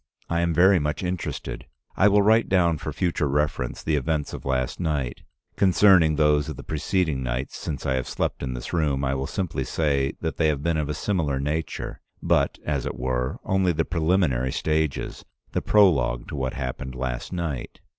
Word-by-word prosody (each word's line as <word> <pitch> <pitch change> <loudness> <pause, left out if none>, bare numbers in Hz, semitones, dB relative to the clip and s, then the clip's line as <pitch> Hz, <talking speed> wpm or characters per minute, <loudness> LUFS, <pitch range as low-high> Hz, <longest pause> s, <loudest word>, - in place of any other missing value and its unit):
I 85 - +2
am 85 0 +1
very 90 +3 +5
much 75 +4 -2
interested. 90 -1 -4 0.3
I 100 - +5
will 105 0 +5
write 110 +2 +4
down 85 -5 +3
for - - -4
future 85 -5 0
reference 70 -3 -1
the 80 - +1
events 75 +1 -1
of - - -7
last 65 -2 -1
night. 75 -8 -2 0.4
Concerning 95 -4 +5
those 75 -2 +3
of - - -5
the - - -9
preceding 80 -2 -1
nights 65 +2 -3
since 70 -4 -5
I 70 - +1
have 65 - -3
slept - - -2
in 65 -2 -3
this - - -7
room, 75 -5 +1
I 65 - 0
will 65 0 -2
simply 85 -8 -2
say 70 0 0
that 80 -1 -3
they 80 - +3
have 75 -2 0
been 85 -1 +1
of 75 -1 -1
a 75 - -2
similar 80 -9 -1
nature, 75 +1 -3 0.2
but, - - +1
as 70 -4 -1
it - - -4
were, 65 0 -1
only 95 -2 +2
the 80 +1 0
preliminary 80 -7 +1
stages, 80 -1 -1 0.3
the - - -1
prologue 70 - +3
to - - -5
what 65 -2 -2
happened 65 -1 -5
last 60 -2 -4
night. 85 -8 -4
75 Hz, 190 wpm, -25 LUFS, 65-85 Hz, 0.4 s, very